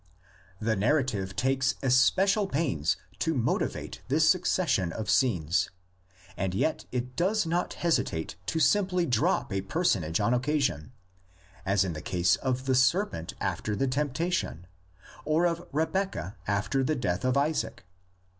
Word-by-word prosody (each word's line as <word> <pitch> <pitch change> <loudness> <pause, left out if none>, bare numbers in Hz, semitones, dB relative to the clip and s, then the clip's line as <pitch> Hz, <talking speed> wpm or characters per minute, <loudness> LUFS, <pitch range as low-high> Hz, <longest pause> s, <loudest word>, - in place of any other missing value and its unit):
The 110 0 0
narrative 105 -4 0
takes 135 +2 +1
especial 190 - +3
pains 135 - 0 0.2
to 160 - 0
motivate 125 -1 -2
this 155 +4 +3
succession 155 - +2
of 110 +3 -3
scenes; 95 - +2 0.7
and 95 0 -2
yet 155 - 0
it 125 0 -3
does 195 +3 +1
not 170 +2 -1
hesitate 155 - -1
to 165 - 0
simply 185 -1 +2
drop 115 -5 +1
a 95 - 0
personage 95 - 0
on 110 +3 +2
occasion, 125 - 0 0.8
as 95 0 +3
in 90 - -3
the 75 - -6
case 90 0 +2
of 130 0 -2
the 130 - +2
serpent 130 - +1
after 105 - -2
the 135 - 0
temptation, 140 - -1 0.6
or 155 +3 +2
of 170 -1 -1
Rebeccah 160 - -2
after 105 +7 0
the 155 +4 0
death 90 -8 -2
of 130 +1 +2
Isaac. 145 - -1
130 Hz, 135 wpm, -28 LUFS, 100-160 Hz, 0.8 s, especial